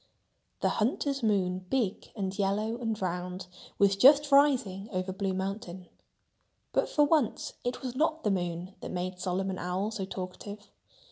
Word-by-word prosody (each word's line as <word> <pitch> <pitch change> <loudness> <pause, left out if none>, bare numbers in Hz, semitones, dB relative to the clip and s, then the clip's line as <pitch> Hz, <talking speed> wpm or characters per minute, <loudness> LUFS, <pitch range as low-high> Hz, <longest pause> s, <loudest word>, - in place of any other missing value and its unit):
The - - +3
hunter's 275 +4 0
moon, 185 -4 +1
big 225 -6 -1
and 195 -3 -2
yellow 210 +3 0
and 225 -3 -2
round, 180 0 -3 0.3
was 200 -1 +4
just 285 +7 +6
rising 245 -9 +4
over 185 -1 -2
Blue 195 0 -1
Mountain. 190 -2 -4 0.8
But - - +2
for 295 - +4
once 290 -5 +1
it 245 +2 -3
was 255 -1 -4
not 315 +3 +1
the 210 - +2
moon 175 0 -2
that - - -6
made 180 0 -3
Solomon 185 +1 -1
Owl 185 +4 -1
so 205 -3 -3
talkative. 200 +3 -7
195 Hz, 150 wpm, -30 LUFS, 185-235 Hz, 0.8 s, just